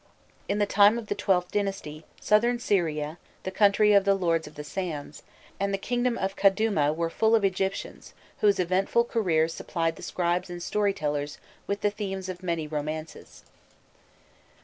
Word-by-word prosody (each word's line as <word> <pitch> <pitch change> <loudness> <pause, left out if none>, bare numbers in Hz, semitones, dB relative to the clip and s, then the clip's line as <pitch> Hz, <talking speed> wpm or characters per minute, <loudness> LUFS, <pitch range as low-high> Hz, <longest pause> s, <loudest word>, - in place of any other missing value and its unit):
In 200 - +1
the 205 - +2
time 205 +2 +5
of 230 -3 -7
the - - 0
XIIth 180 -2 +1
dynasty, 195 -7 -3
Southern 235 +3 +3
Syria, 160 -7 -1 0.2
the 190 - -4
country 205 +1 +4
of 200 -1 +6
the 195 0 +3
"Lords 165 -4 0
of 150 - -13
the 150 - -6
Sands," 155 -2 -5 0.4
and 200 0 0
the 195 - 0
kingdom 245 +3 -1
of 195 0 -2
Kadûma 195 -7 +2
were 165 0 -1
full 220 +4 +3
of 215 -3 +2
Egyptians 190 0 -3 0.2
whose 205 -1 +4
eventful 185 +6 +2
careers 165 -9 +1
supplied 165 -2 -2
the - - -11
scribes 175 0 -1
and 175 -1 -6
storytellers 150 -9 -1 0.3
with 200 +1 -2
the 205 - +2
themes 195 -3 -5
of 180 0 -6
many 170 -3 -2
romances. 155 +1 -6
190 Hz, 165 wpm, -27 LUFS, 165-205 Hz, 0.4 s, of